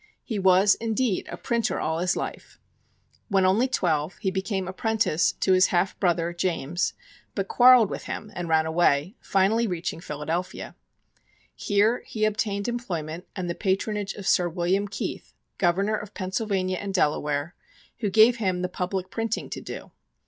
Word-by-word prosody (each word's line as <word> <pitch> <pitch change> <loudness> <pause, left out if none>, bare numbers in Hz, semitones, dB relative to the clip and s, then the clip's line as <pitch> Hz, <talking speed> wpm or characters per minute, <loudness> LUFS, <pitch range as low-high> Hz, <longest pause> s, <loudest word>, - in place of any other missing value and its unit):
He 220 -5 -3
was, 190 +1 +5
indeed, 230 -2 -1
a - - -5
printer 235 -2 -1
all 160 +1 -1
his 180 +1 +1
life. - - -6 0.7
When 195 -2 +3
only 210 +7 +3
twelve, 165 - 0
he 190 - -1
became 190 0 -2
apprentice 200 -4 +1
to 190 - +1
his 185 +1 +5
half 180 +2 +1
brother, 175 -2 +1
James, 170 -2 -1 0.4
but 195 -1 -2
quarreled 245 -4 +6
with - - -5
him 215 - -6
and 175 -1 -5
ran 160 0 +3
away, 160 - +2
finally 210 +4 +2
reaching 175 -3 -3
Philadelphia. 165 +3 -4 0.8
Here 210 +4 +1
he 215 -1 0
obtained 205 -1 -1
employment 180 -8 -4
and 185 -3 -3
the 170 - -1
patronage 200 +2 -1
of 200 - -8
Sir 180 -2 +3
William 180 +4 0
Keith, 205 - -5 0.3
Governor 195 +4 +2
of 210 0 -9
Pennsylvania 185 -1 -1
and 200 -1 -4
Delaware, 150 -1 0 0.5
who 215 -4 0
gave 220 +5 +6
him 185 -5 -1
the 180 - -1
public 185 +1 -3
printing 225 -1 -3
to - - -5
do. - - -8
190 Hz, 155 wpm, -25 LUFS, 175-210 Hz, 0.8 s, quarreled